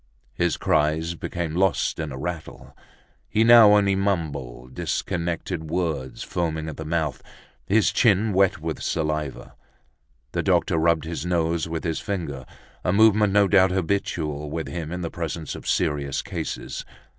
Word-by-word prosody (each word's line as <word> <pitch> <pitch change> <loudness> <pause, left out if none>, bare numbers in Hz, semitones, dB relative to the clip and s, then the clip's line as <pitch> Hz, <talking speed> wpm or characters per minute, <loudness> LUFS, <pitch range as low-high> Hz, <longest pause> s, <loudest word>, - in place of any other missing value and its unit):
His 85 -1 0
cries 80 +3 +1
became 85 -1 -4
lost 95 +1 +1
in 80 -2 -3
a 65 - -6
rattle. 85 +3 -6 0.5
He 110 +1 +3
now 115 -3 +8
only 100 -1 +3
mumbled 75 -11 -2
disconnected 85 0 -3
words, 80 -7 -2
foaming 80 -3 -2
at 80 - -6
the 80 - -6
mouth, 80 -3 -1 0.5
his 105 +2 +3
chin 105 -2 +3
wet 95 -2 +3
with 80 0 -4
saliva. 75 -3 -2 0.8
The - - -1
doctor 80 - +2
rubbed 80 -1 +2
his 80 -3 -4
nose 85 -1 0
with 80 0 -3
his 80 -3 -1
finger, 70 -10 -4 0.4
a - - +1
movement 105 0 +5
no 100 0 +4
doubt 95 -1 +5
habitual 80 -5 -2
with 80 +1 -4
him 85 -2 -5
in 90 +1 -4
the 85 - -4
presence 80 -2 -4
of - - -9
serious 70 -2 0
cases. - - -5
85 Hz, 150 wpm, -24 LUFS, 75-95 Hz, 0.8 s, now